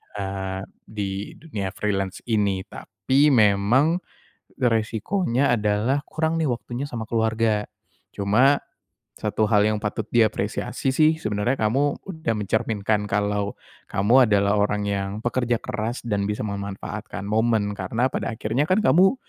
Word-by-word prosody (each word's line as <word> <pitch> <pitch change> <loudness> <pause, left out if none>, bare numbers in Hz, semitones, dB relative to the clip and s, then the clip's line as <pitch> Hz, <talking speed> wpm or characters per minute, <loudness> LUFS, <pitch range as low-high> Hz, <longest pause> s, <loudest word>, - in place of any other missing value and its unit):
eee, 95 -1 -4 0.3
di 100 -1 -4
dunia 105 - -5
freelance 95 -3 -2
ini 100 -3 +1
tapi 140 +3 0
memang, 120 - +4 0.6
resikonya 120 - +1
adalah 105 +7 0
kurang 160 +1 -1
nih 160 - +1
waktunya 125 +1 -3
sama 115 -5 -6
keluarga, 110 -2 +1 0.5
cuma, 120 +8 +3 0.6
satu 110 -1 0
hal 105 -1 +4
yang 110 0 0
patut 105 - -3
diapresiasi 115 +4 +1
sih 155 +2 +4
sebenernya 110 +1 -1
kamu 135 +7 0
udah 160 -11 -2
mencerminkan 105 0 0
kalau, 100 0 -1 0.3
kamu 115 +4 +4
adalah 100 0 +3
orang 105 0 0
yang 100 -1 -1 0.2
pekerja 120 -1 +1
keras 115 +3 -4
dan 100 -2 -1
bisa 105 +1 -2
memanfaatkan 100 0 -5
momen 110 -1 +1
karena 105 +6 -1
pada - - -2
akhirnya 120 +8 0
kan 185 - +4
kamu, 190 +7 +5
110 Hz, 130 wpm, -24 LUFS, 100-125 Hz, 0.6 s, kamu